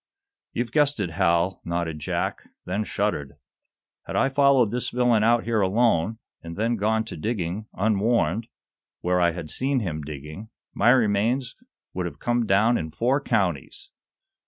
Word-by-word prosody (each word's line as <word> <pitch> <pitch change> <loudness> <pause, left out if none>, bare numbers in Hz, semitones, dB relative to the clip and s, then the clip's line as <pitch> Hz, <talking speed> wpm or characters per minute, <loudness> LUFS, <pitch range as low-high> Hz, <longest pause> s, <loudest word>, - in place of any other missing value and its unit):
"You've 120 -1 -2
guessed 145 -3 +2
it, 90 -5 -2
Hal," 85 +1 +1
nodded 85 -2 -3
Jack, - - -3 0.2
then 100 +4 -1
shuddered. 100 -10 -2 0.7
"Had - - -5
I 135 - +3
followed 135 -5 +4
this 125 +1 -2
villain 120 -3 +2
out 115 +1 +3
here 115 -2 0
alone, 105 0 +2 0.2
and 85 0 -8
then 115 +3 +1
gone 110 +1 +1
to 110 - -8
digging, 100 +2 -3
unwarned, 110 -1 +1 0.5
where 90 0 +1
I 85 - +4
had 85 -3 -5
seen 130 - 0
him 80 -7 -3
digging, 75 +8 -8 0.2
my - - +3
remains 120 +2 +2 0.4
would 90 -1 -2
have - - -9
come 120 -1 0
down 110 +5 +3
in 80 - -4
four 125 - 0
counties. 95 - -2
105 Hz, 155 wpm, -25 LUFS, 85-120 Hz, 0.7 s, followed